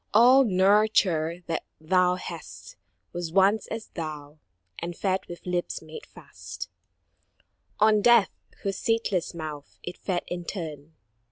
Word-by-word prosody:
All 250 +4 +8
nurture 190 -5 +3
that 165 - -2 0.2
thou 180 +3 +3
hast - - -9 0.4
Was 175 -2 -4
once 195 +3 +3
as 225 -1 -6
thou, 155 -2 -7 0.4
and 170 0 -5
fed 190 -1 -1
with 175 - -10
lips 180 -1 -2
made 465 - -10
fast - - -9 1.1
On 215 0 +5
Death, 235 -3 +5 0.3
whose 195 -1 -2
sateless 215 -7 0
mouth 155 -3 -7
it 175 - -6
fed 180 -3 -2
in 175 0 -5
turn. 160 -5 -6
180 Hz, 125 wpm, -26 LUFS, 165-210 Hz, 1.1 s, All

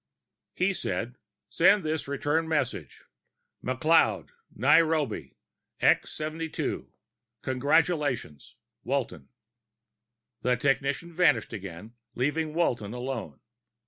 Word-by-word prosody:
He - - +1
said, - - -3 0.3
"Send 205 -1 +4
this 155 -1 -2
return 145 +3 0
message: 130 - -2 0.6
McLeod, 155 +6 +2 0.2
Nairobi, 150 - +2 0.4
X - - +3
72. 155 +1 -4 0.5
Congratulations! 140 - 0 0.3
Walton." 115 - -3 1.1
The 125 0 +2
technician 140 +5 0
vanished 175 -8 +3
again, 100 +1 -8 0.2
leaving 150 +4 -1
Walton 120 -10 0
alone. 125 -1 -5
140 Hz, 80 wpm, -28 LUFS, 120-160 Hz, 1.1 s, Send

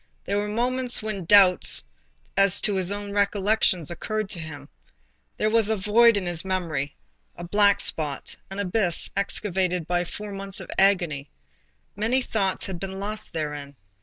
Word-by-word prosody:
There 200 +1 -1
were 205 - -2
moments 245 +2 +1
when 210 -5 -4
doubts 190 -1 +5 0.5
as 195 -1 +7
to 210 - +3
his 190 -1 -1
own 205 0 -5
recollections 200 -4 +1
occurred 215 +3 -4
to 180 - -3
him. 155 -2 -9 0.7
There 215 - 0
was 225 -2 +4
a 220 - 0
void 215 +3 +4
in 195 - -3
his 175 -2 0
memory, 165 -7 -3 0.4
a 175 - -9
black 200 +3 +3
spot, 150 -3 -2
an 195 - -8
abyss 190 -3 +1
excavated 185 -3 -1
by 175 +1 -1
four 210 +4 -8
months 195 -1 -5
of - - -9
agony.—Many 175 - -2
things 195 -5 -1
had 190 -3 -5
been 190 +1 -6
lost 210 +2 -5
therein. 150 -3 -5
195 Hz, 155 wpm, -24 LUFS, 175-210 Hz, 0.7 s, as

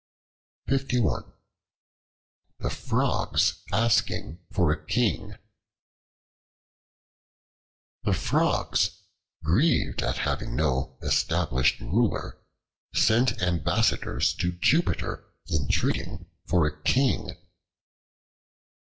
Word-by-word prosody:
The 130 -4 0 1.4
Frogs - - 0
Asking 110 -5 +1
for 85 -5 +2
a 80 - -3
King 110 +2 0 2.7
THE - - 0
FROGS, - - +1 0.4
grieved 110 - +2
at - - -1
having - - -2
no 65 -3 -1
established 65 0 +1
Ruler, 115 +2 -1 0.5
sent 120 -3 +3
ambassadors 85 -5 +1
to 90 - 0
Jupiter 155 - +1 0.3
entreating 70 -4 -1 0.2
for 85 -4 +3
a 75 0 -4
King. 130 - +1
90 Hz, 70 wpm, -26 LUFS, 75-120 Hz, 2.7 s, sent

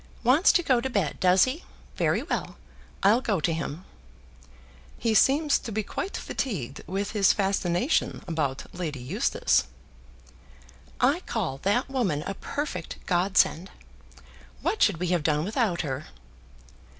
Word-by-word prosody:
"Wants 265 - +5
to 350 - +3
go 255 -6 +3
to 265 - -2
bed, 200 - -1
does 180 0 +5
he? 265 +7 -2 0.3
Very - - +1
well. - - -3 0.5
I'll 215 +6 +5
go 210 -7 0
to 165 +2 0
him." 165 +2 -5 1.1
"He 225 -2 0
seems 285 +7 +4
to 230 - -7
be 215 +1 -1
quite 385 - -4
fatigued 150 - -4
with 195 +4 -2
his 205 -3 +4
fascination 195 - 0
about 150 -5 -2
Lady 165 -5 -4
Eustace." 125 +1 +1 1.3
"I 275 +7 +3
call 170 - -2
that 205 - +1
woman 215 - -1
a 195 - -3
perfect 195 - -5
God 185 +2 0
send. 180 +5 +3 0.9
What 440 - -1
should 200 -6 +4
we 180 +1 -2
have 175 -2 +2
done 150 0 +1
without 210 -4 0
her?" 140 -2 -4
195 Hz, 140 wpm, -26 LUFS, 165-245 Hz, 1.3 s, Wants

